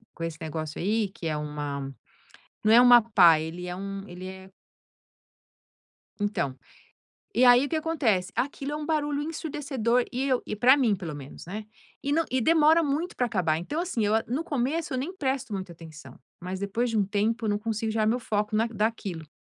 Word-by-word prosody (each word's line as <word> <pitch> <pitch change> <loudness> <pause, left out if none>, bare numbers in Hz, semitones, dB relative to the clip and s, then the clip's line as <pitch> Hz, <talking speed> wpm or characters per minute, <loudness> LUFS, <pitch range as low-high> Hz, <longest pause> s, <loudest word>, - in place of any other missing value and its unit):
com 165 - -6
esse 165 -1 -4
negócio 155 -1 -5
aí, 210 +1 +1
que 175 -3 -7
é 155 - -1
uma 145 -2 -4 0.7
não 215 +1 +5
é 240 - +9
uma 245 -1 +8
pá, 180 -8 +6
ele 170 +3 -5
é 180 - -4
um 195 +1 -6
ele 180 0 -8
é 190 0 -10 1.7
Então, 170 -10 -1 0.8
e 245 - +4
aí 245 +2 +7
o - - -7
que 320 - -1
acontece? 250 - 0
Aquilo 280 +1 -2
é 300 - -4
barulho 295 -2 0
ensurdecedor 275 -6 -1
e 255 +1 -2
eu 255 -2 +1
e 210 - -4
pra 255 +5 +6
mim 235 -7 +2
pelo 170 -5 -6
menos, 140 -1 -10
né. 210 +4 -6 0.4
E 280 +1 -1
não 330 +2 +2
e 260 0 +1
demora 320 +3 +5
muito 310 +4 -1
pra 250 - +1
acabar 175 -8 0
então 290 - -3
assim 250 - -1
eu 210 - +1
no 265 +7 -2
começo 290 +1 -2
eu 255 - 0
nem 320 +9 -4
presto 265 - -2
muita 190 -3 -5
atenção, 155 -5 -12 0.2
mas 185 +2 -5
depois 225 +5 -1
de 210 -3 +1
tempo 220 +3 0
eu 215 - +1
não 205 - 0
consigo 220 0 -2
tirar 215 -1 +1
meu 235 +3 +2
foco 210 -2 -1
na 225 - +2
daquilo. 210 -7 -3
220 Hz, 195 wpm, -27 LUFS, 180-265 Hz, 1.7 s, é